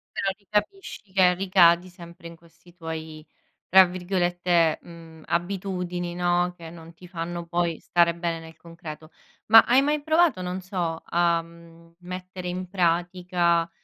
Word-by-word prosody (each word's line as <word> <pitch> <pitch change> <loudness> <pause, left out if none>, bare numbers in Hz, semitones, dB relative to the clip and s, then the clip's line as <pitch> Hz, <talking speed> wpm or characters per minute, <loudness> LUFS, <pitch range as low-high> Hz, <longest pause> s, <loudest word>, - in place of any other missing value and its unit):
Però - - -2
lì 200 - -32
capisci, 210 - -3
che 180 -2 +5
ricadi 180 -2 +4
sempre 170 -1 -13
in 170 - -11
questi 170 +1 -22
tuoi, 160 -2 -8 0.4
tra 190 +1 +8
virgolette, 175 -2 0
mhmm, 165 -2 -14
"abitudini", 180 -1 -3
no, 175 0 +1
che 165 -1 -10
non 165 0 -13
ti 180 +2 -15
fanno 170 -1 -5
poi 170 -1 -1
stare 170 -1 +2
bene 170 -1 -3
nel 160 -1 -13
concreto. 160 -2 -11 0.4
Ma 225 +1 +9
hai 255 +3 +4
mai 295 +1 0
provato, 315 - +2
non 180 +1 -4
so, 175 -3 -3
a, 170 -1 +1
mhmm, 165 0 -18
mettere 180 0 -7
in 185 +1 -5
pratica, 175 -1 0
175 Hz, 145 wpm, -25 LUFS, 170-185 Hz, 0.4 s, Ma